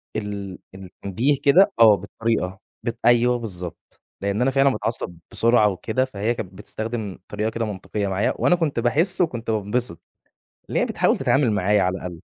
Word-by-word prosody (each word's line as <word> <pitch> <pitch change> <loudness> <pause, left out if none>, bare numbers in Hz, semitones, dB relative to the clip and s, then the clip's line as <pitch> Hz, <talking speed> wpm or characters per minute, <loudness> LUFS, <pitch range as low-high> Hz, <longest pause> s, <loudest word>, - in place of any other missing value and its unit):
ال 100 -3 -4 0.2
ال 95 - -10
التنبيه 100 +9 -1
كده 185 +8 +6
آه 110 -3 +8
بالطريقة، 100 -1 -2 0.2
بت 115 -1 -3
أيوَه 120 +1 +4
بالضبط، 90 -6 -8 0.2
لإن 100 +3 -1
أنا 135 +2 +3
فعلًا 135 +1 +4
باتعصب 105 -7 -2
بسرعة 115 -2 +4
وكده 110 +7 -1
فهي 110 -2 -2
كانت 95 -5 -7
بتستخدم 110 0 -5
طريقة 105 +1 -2
كده 115 0 -2
منطقيّة 100 0 -4
معايا، 95 +2 0
وأنا 180 - +3
كُنت 160 -8 -1
باحِس 160 +11 +1
وكُنت 120 -9 -1
بانبسط، 105 -2 -1 0.7
إن - - -3
هي - - +3
بتحاول - - +1
تتعامل 135 -4 +2
معايا 105 0 +2
على 90 +1 0
الأقل. 90 -2 -7
110 Hz, 165 wpm, -23 LUFS, 100-120 Hz, 0.7 s, آه